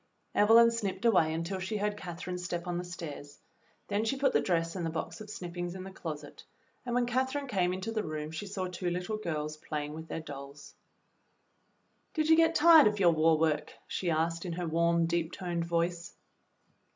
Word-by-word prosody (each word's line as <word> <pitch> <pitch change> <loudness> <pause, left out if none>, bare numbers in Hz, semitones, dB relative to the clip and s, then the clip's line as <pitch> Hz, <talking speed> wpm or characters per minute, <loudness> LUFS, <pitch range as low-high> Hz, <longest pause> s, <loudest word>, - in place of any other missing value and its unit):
Evelyn 230 +2 +6
snipped 230 -1 -3
away 180 -9 +4
until 165 +4 -3
she 190 +3 -3
heard 210 0 -1
Catherine's 180 -1 -6
step 175 0 -3
on 175 -1 -2
the - - -3
stairs, 155 -5 -8 0.5
then 205 +2 0
she 250 +4 0
put 270 -1 +2
the - - +4
dress 165 -1 0
and 180 - -3
the 165 - -1
box 160 +6 -5
of 210 - -9
snippings 175 -2 -5
in 185 - -6
the 190 - -8
closet, 150 -5 -7 0.4
and 245 -1 -3
when 245 0 +3
Catherine 260 +4 -1
came 185 -8 +1
into 190 +4 -3
the 220 -1 -1
room 155 -3 -5
she 160 +6 -5
saw 195 -1 -3
two 180 0 -3
little 180 +5 -2
girls 155 -6 -3
playing 150 -1 -4
with 160 +1 -8
their - - -4
dolls. 140 -1 -9 1.4
"Did 310 -1 +1
you 320 - +8
get 330 0 +4
tired 320 -3 +8
of 210 -1 0
your 175 -3 +6
war 160 0 +4
work.f^" 155 -1 0
she 180 - -2
asked, 165 +1 0
in 175 -3 -4
her 175 +1 -3
warm, 170 +1 +2
deep 170 0 -1
toned 175 -2 -3
voice. 170 0 -1
175 Hz, 200 wpm, -31 LUFS, 165-210 Hz, 1.4 s, you